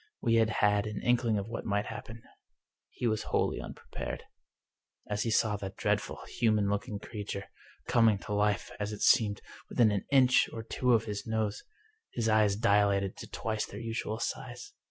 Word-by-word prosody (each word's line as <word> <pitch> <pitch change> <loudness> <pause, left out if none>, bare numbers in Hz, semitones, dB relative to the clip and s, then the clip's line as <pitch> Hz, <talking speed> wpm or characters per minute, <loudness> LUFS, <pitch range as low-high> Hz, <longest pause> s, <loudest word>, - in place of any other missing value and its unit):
We 115 - +1
had 110 -1 +4
had 105 -1 +2
an 105 -1 -4
inkling 120 -3 +2
of 100 +1 -3
what 115 0 -5
might 100 -1 0
happen. 115 +1 -8 0.7
He - - -5
was 110 -2 +1
wholly - - +1
unprepared. - - -7 0.8
As 105 0 -1
he 115 - 0
saw 110 -2 +2
that 95 -1 -7
dreadful, - - 0
human 105 -3 +1
looking 100 +1 -2
creature, 100 -1 -6 0.4
coming 115 -3 +4
to 105 - -3
life, 105 0 +1
as 105 0 -2
it 105 - -4
seemed, 105 -5 +4 0.3
within 115 -3 +4
an 100 -2 -1
inch 130 -2 +5
or 115 - -6
two 125 +2 +1
of 110 -1 +3
his 105 -1 -5
nose, 110 -2 -1 0.5
his 115 -2 -1
eyes 110 -2 +4
dilated 100 -3 +2
to - - -9
twice 110 -1 -2
their - - -8
usual 115 -1 -3
size. 120 +1 -5
110 Hz, 175 wpm, -30 LUFS, 105-115 Hz, 0.8 s, inch